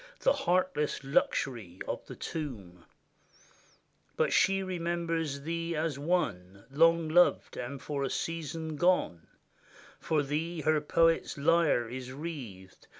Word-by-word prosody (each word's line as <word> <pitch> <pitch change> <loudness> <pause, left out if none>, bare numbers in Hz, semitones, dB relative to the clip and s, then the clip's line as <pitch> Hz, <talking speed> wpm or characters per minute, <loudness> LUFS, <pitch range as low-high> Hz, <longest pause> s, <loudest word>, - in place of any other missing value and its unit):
The - - +4
heartless 175 -6 0
luxury 120 -8 0
of - - -4
the - - -8
tomb: 100 - -6 1.3
But - - +2
she 195 0 +3
remembers 170 -5 -2
thee 165 +2 -3
as 155 -2 -1
one 100 - -1
Long 165 +3 +4
loved, 175 +3 +3
and 135 +3 -5
for 140 +1 -3
a 135 - -1
season 160 0 -4
gone; 175 - +1 0.7
For 155 -3 0
thee 160 +4 -2
her 155 0 +2
poet's 165 +2 +2
lyre 150 -5 +3
is 125 +2 -6
wreathed. 130 - -8
155 Hz, 120 wpm, -30 LUFS, 135-165 Hz, 1.3 s, The